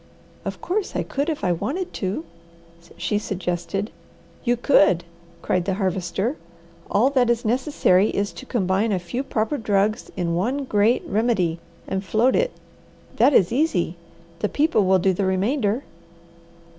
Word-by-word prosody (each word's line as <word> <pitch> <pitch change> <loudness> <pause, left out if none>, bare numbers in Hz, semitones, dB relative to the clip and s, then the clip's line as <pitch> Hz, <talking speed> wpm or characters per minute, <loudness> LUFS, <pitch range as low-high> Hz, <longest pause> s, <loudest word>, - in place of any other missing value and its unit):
"Of - - -5
course 385 +3 -2
I - - 0
could 280 +3 -2
if 305 -8 -3
I 180 - +2
wanted 305 - -2
to!" 185 -4 -3 0.7
she 210 - 0
suggested. 185 +1 -3 0.5
"You 245 -1 +2
could!" 195 - +4 0.4
cried 180 -1 0
the 195 -1 0
Harvester. 190 - -1 0.5
"All 245 +7 +3
that 255 -3 +3
is 235 0 +1
necessary 220 -5 +2
is 200 0 -1
to 265 - -10
combine 200 -1 +1
a 195 - +2
few 180 +8 -3
proper 270 +1 -1
drugs 210 0 0
in 170 -2 0
one 245 +11 0
great 215 -1 +2
remedy 195 -6 +1 0.3
and 190 0 -2
float 225 +6 +2
it. - - +2 0.7
That - - +5
is 180 - +5
easy! 240 - +1 0.4
The 210 - 0
people 295 - +2
will 190 0 +5
do 190 +1 +2
the 195 +2 -1
remainder." 210 +5 0
210 Hz, 150 wpm, -23 LUFS, 185-255 Hz, 0.7 s, That